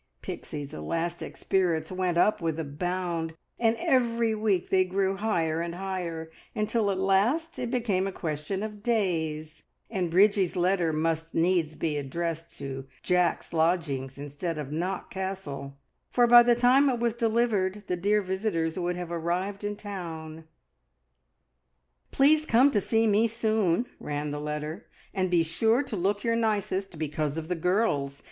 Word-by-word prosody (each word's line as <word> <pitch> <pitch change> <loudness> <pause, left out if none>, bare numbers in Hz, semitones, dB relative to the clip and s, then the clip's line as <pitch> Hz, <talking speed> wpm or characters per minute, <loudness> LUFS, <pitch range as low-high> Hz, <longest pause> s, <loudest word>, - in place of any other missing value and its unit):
Pixie's 145 -2 -6
elastic 165 - -3
spirits 170 -4 0
went 185 -2 0
up 210 +3 +3
with 165 -2 -1
a - - -1
bound, 170 +2 -3 0.2
and 230 -1 +3
every 235 -2 +2
week 210 -4 0
they 185 -1 +5
grew 190 +1 0
higher 165 -7 0
and 170 0 -4
higher, 175 -4 -4 0.2
until 215 0 +1
at 195 - 0
last 210 - +1
it 245 - -2
became 220 -7 0
a - - -3
question 160 +3 -3
of 210 -1 -6
days, 160 -8 -1 0.3
and 185 -5 -1
Bridgie's 195 +1 +4
letter 180 -2 +2
must 160 +1 -1
needs 165 -2 +2
be 155 -2 -1
addressed 165 +4 -4
to 135 -1 -6 0.2
Jack's 180 -1 +1
lodgings 160 -6 0
instead 145 +4 -4
of 145 -2 -5
Knock 180 +4 -3
Castle, 185 -8 -5 0.3
for 245 - +4
by 240 0 +9
the 240 0 +4
time 255 +4 +5
it 245 -2 0
was 235 -1 +1
delivered 220 -4 +1
the 180 - -1
dear 205 +4 +2
visitors 185 -3 -1
would 175 0 -1
have 175 -1 -5
arrived 180 +4 -2
in 205 0 -2
town. 165 -6 -7 1.6
"Please 300 +3 +4
come 265 0 +4
to 205 - +2
see 225 +3 +2
me 215 +1 +4
soon," 220 -3 +1
ran 145 0 -3
the 145 0 -4
letter, 150 +6 -4 0.3
"and 185 -2 0
be 175 -2 +3
sure 225 - +2
to 255 -5 -5
look 200 +2 0
your 230 -1 +2
nicest, 200 -5 -1
because 150 -1 -2
of 160 -1 -4
the - - +1
girls! 160 -6 0
185 Hz, 155 wpm, -28 LUFS, 160-215 Hz, 1.6 s, by